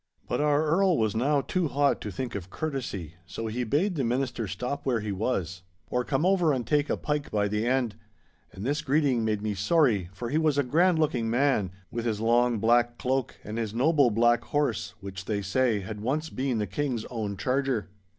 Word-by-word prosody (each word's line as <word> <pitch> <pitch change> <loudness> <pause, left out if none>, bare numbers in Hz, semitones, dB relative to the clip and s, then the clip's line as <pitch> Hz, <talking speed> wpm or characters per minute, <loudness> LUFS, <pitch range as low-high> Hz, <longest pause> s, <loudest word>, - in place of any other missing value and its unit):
But - - -1
our 150 +1 +3
Earl 180 +3 +3
was 110 -2 +1
now 140 +5 +2
too 180 +3 -1
hot 140 +1 +1
to 105 - -4
think 120 +5 -4
of 95 -2 -6
courtesy, 110 - -4
so 115 - -5
he 115 +3 -2
bade 155 - +1
the 145 -6 -1
minister 125 -2 -1
stop 125 +9 -4
where 125 -4 +1
he 105 -1 -3
was, 95 -4 -2 0.3
or 125 - +1
come 135 +4 0
over 180 -4 +3
and 125 -3 -2
take 150 -1 +1
a - - 0
pike 150 -1 -2
by 105 -1 +1
the 105 +3 -1
end; 125 -4 +1 0.6
and 95 - -7
this 145 +3 0
greeting 140 -5 +2
made 105 -2 -1
me 105 -1 -1
sorry, 105 - +2
for 105 +5 -5
he 155 - +2
was 155 -3 +2
a 145 - +3
grand 165 +7 +3
looking 130 -8 +1
man, 120 -5 +2 0.2
with 115 0 -3
his 110 -3 -1
long 120 +1 +3
black 120 +2 +3
cloak 130 -1 -1
and 110 +2 -5
his 110 -1 -3
noble 140 +1 +4
black 120 +1 +3
horse, 145 -6 -1
which, 95 -1 -7
they 105 -2 -2
say, 110 +1 +1
had 105 +2 -7
once 150 +7 -1
been 130 -2 -1
the 105 - 0
King's 120 +3 -2
own 105 -4 -3
charger. 130 -5 0
120 Hz, 210 wpm, -27 LUFS, 110-145 Hz, 0.6 s, noble